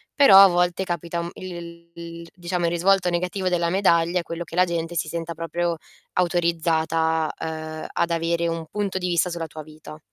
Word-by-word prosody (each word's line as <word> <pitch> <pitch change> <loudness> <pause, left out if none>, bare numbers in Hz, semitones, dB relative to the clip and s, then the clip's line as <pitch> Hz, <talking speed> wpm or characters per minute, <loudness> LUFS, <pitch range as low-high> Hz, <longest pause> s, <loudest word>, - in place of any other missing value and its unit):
Però 275 -10 +8
a 195 0 +11
volte 180 0 +1
capita, 170 -1 -3
mhmm, 170 - -5
il 170 -2 -9
il 170 0 -9
diciamo, 175 -1 -2
il 170 - +1
risvolto 180 +2 +2
negativo 180 +2 -2
della 170 -1 +1
medaglia 170 -2 +2
è - - -1
quello 170 0 -5
che 165 - -10
la 180 - +5
gente 170 -1 -3
si 165 - -1
senta 170 0 -4
proprio 170 +1 -2 0.4
autorizzata, 165 -2 +1
ehm, 155 0 -5
ad 170 - 0
avere 170 0 0
un 165 -1 -3
punto 200 -2 -2
di 180 -1 -2
vista 175 0 +1
sulla 170 -2 -4
tua 155 0 -9
vita. 155 0 -12
170 Hz, 190 wpm, -23 LUFS, 165-180 Hz, 0.4 s, a